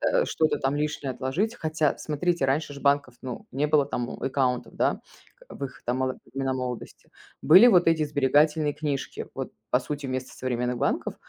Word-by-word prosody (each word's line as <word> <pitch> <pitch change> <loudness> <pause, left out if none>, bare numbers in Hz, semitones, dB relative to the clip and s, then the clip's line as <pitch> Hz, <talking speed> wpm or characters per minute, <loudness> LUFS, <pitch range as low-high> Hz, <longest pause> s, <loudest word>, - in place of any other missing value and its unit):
э, - - +2
что-то 155 -1 +1
там 135 +2 0
лишнее 150 -2 -2
отложить. 140 - -1
Хотя, 155 -2 0
смотрите, 160 0 0
раньше 145 +2 0
ж 140 - -9
банков, 140 -3 +2
ну, 125 -3 -6
не 140 +3 0
было 145 -2 +3
там 120 -3 -3
у - - -8
аккаунтов, 130 -2 0
да, - - +1 0.5
в 140 - -6
их 135 - -9
там 125 +2 -1
моло 130 0 -1 0.2
времена 135 -1 -1
молодости. 125 -2 -6 0.3
Были 185 - +8
вот 180 -6 +5
эти 160 -2 +3
сберегательные 150 +2 +2
книжки, 145 -3 -4
вот - - -5 0.2
по - - +4
сути 145 -2 -5
вместо 130 0 -4
современных 125 -1 -2
банков. - - -1
140 Hz, 180 wpm, -26 LUFS, 130-155 Hz, 0.5 s, Были